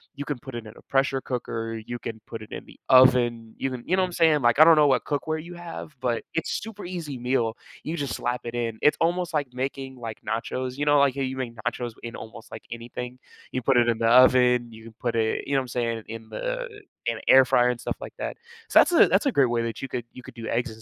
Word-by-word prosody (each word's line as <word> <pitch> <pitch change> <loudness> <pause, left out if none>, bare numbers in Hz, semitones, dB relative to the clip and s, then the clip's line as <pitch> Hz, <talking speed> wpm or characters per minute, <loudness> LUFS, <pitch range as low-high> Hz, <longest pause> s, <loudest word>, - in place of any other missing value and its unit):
you 145 - -5
can 140 -4 -3
put 130 0 -9
it 115 -2 -6
in 110 - -10
a - - -15
pressure 135 0 +1
cooker, 115 -3 -4
you 120 +1 -5
can 110 -1 -6
put 115 -2 -7
it 110 - -12
in - - -7
the - - -17
oven, 120 -3 +5
you 135 - -1
can 125 -2 -6
you 185 - +2
know 190 - +2
what 185 - +2
I'm - - -9
saying? 160 -4 +4
Like 120 0 +3
I 155 - +10
don't 165 0 +8
know 150 -1 +5
what 135 - +2
cookware 155 +2 -2
you 175 +1 -10
have, 170 -3 -8
but 120 -2 -1
it's 165 - -2
super 215 -1 -8
easy 165 -7 -5
meal. 120 -2 0 0.3
You 160 +3 -3
just 140 -6 -3
slap 120 +1 -2
it 120 0 -6
in. 115 -2 -2
It's 150 - +4
almost 175 +1 +1
like 145 -5 -1
making, 135 +1 -4
like, 115 -3 -6
nachos, 125 +3 -3
you 145 - -1
know, 145 0 +5
like 140 -2 +4
how 140 - -3
you 130 0 -2
make 120 -3 -4
nachos 120 +2 -3
w - - -22
in 120 0 -6
almost 110 0 -10
like - - -8
anything, 120 +2 -7 0.3
you 130 - -2
put 130 +1 +3
it 120 -1 +4
in 115 - 0
the 115 - +2
oven, 125 0 +5
you 110 0 -13
can 115 - -12
put 120 -2 -2
it, 110 -1 0
you 140 - -2
know 135 - +4
what - - -2
I'm 130 - -10
saying, 115 -2 -2
in 110 0 -8
the, - - -3 0.4
in 115 -1 0
a - - -9
air 130 0 +8
fryer 125 0 +3
and 125 -1 -2
stuff - - -4
like - - -8
that. - - -4 0.3
So, - - +7
that's - - +5
a, 335 - +7
that's - - +2
a 275 - +3
great 135 - +3
way 120 - +1
that 115 -1 -4
you 135 - -2
could, 120 -2 -4
you 125 - -11
could - - -11
do 115 -2 -7
eggs 120 +2 -1
and 110 0 -13
125 Hz, 285 wpm, -25 LUFS, 115-140 Hz, 0.4 s, I